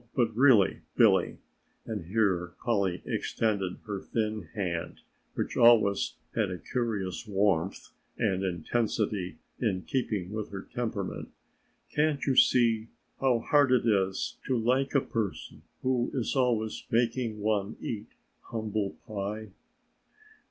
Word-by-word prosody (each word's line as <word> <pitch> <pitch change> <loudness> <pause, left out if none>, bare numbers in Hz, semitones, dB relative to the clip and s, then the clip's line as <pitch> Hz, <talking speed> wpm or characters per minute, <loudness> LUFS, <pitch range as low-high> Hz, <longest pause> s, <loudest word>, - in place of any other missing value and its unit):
But 115 -3 +1
really, 120 -6 +5 0.2
Billy," - - +4 0.5
and - - -4
here 90 -3 +1
Polly 100 -6 +1
extended 100 -5 -1
her 100 -3 -4
thin 110 -6 -2
hand, 90 -5 -3 0.3
which - - -2
always 110 -4 +5 0.2
had 105 -4 +1
a 90 - -4
curious 110 -3 -3
warmth 95 -3 0 0.3
and 95 0 +1
intensity 95 -1 -1 0.2
in 95 -6 0
keeping 105 -8 -2
with 110 -1 -4
her 100 -1 -6
temperament, 110 -5 -3 0.7
"can't 150 -1 +2
you 135 - +2
see 115 -3 +4 0.3
how 125 -4 +2
hard 145 +1 +4
it 125 -2 +3
is 95 -4 +1
to 130 - +2
like 130 +5 +1
a 140 - +5
person 110 -6 -4 0.2
who 125 -2 +1
is 125 0 -1
always 120 -4 +1
making 115 -1 0
one 105 -1 0
eat 105 -2 -4 0.4
humble 110 -3 -2
pie?" 105 0 -4
110 Hz, 125 wpm, -29 LUFS, 100-120 Hz, 0.7 s, really